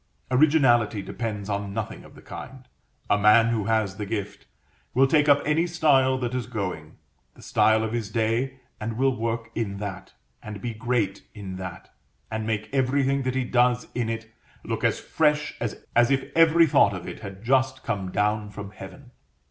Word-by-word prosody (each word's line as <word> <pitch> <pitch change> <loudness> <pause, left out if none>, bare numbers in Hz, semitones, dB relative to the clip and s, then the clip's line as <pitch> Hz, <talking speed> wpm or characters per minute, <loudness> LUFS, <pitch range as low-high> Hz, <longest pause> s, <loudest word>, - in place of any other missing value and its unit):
Originality 125 -7 +4
depends 105 0 -4
on 100 -1 -3
nothing 110 -1 -4
of - - -16
the - - -15
kind. 130 -1 -10 0.4
A 105 - +2
man 105 +3 +6
who 110 -3 0
has 110 -3 0
the 105 - -4
gift, 105 -2 -5 0.5
will 135 +2 +6
take 145 +1 +3
up 145 0 +5
any 155 +3 +2
style 140 -6 +3
that 125 -1 -3
is 125 -4 -2
going, 95 -10 -5 0.4
the - - -16
style 110 0 +3
of 110 0 -3
his 115 -4 -2
day, 115 +4 -1 0.2
and 110 +1 -4
will 135 0 +2
work 115 0 -3
in 100 -4 -3
that, 95 -2 -7 0.3
and 105 -1 -7
be 120 +2 -4
great 110 -3 -2
in 95 -3 -7
that, 90 -2 -8 0.4
and 110 0 -3
make 110 -1 -2
everything 135 +1 +1
that 130 -1 -2
he 130 - +1
does 125 0 +2
in 120 -2 -1
it 115 0 -4 0.4
look - - -4
as - - +2
fresh 150 -1 +1
as 115 -3 -4 0.2
if 135 -1 0
every 165 0 +6
thought 100 -9 +4
of 90 - -7
it - - -7
had 100 -1 -9
just 130 +1 +1
come 100 -5 -3
down 105 +2 0
from 100 -1 -8
heaven. 125 +7 -12
115 Hz, 180 wpm, -25 LUFS, 105-130 Hz, 0.5 s, man